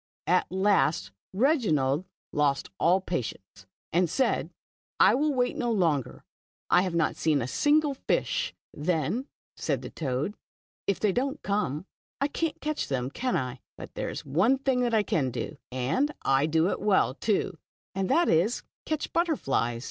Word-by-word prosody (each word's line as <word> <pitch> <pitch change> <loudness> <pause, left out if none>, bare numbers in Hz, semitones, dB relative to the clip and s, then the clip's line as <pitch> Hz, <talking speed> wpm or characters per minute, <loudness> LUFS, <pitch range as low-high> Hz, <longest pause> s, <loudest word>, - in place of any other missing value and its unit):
At 180 0 +2
last 190 - +2 0.2
Reginald 185 - +2 0.3
lost 140 -2 +1
all 180 +3 +4
patience, 105 - -5 0.3
and 175 0 +3
said, 265 - +1 0.3
" - - -66
I - - +4
will 300 +3 +2
wait 250 -2 0
no 240 -1 -1
longer, 165 - 0 0.5
I 180 - +6
have 180 -2 -2
not 165 -2 +1
seen 155 -3 +2
a 120 - -2
single 295 - +3
fish." 265 - -1
" - - -77
Then," 175 - -1 0.3
said - - -2
the - - -7
toad, 140 +5 -2 0.3
" - - -79
if 200 - +1
they 210 - +2
don't 270 +7 -2
come, 185 -6 -1 0.3
I 280 - +1
can't 325 +1 -2
catch 305 0 -2
them, 130 -1 -2
can 255 - -1
I? 125 0 -3 0.2
But - - -9
there - - -3
is - - -6
one 180 - +3
thing 250 -3 +1
I 220 -2 +3
can 140 -8 0
do, 125 - -5
and 130 - 0
I 135 +2 +3
do 160 +3 +2
it - - -3
well, 195 -10 +3
too, 185 0 -1 0.3
and 190 0 -1
that 345 0 +4
is 180 +9 +2
to - - -40 0.2
catch 310 -1 -2
butterflies. 135 - 0
185 Hz, 170 wpm, -28 LUFS, -, 0.5 s, I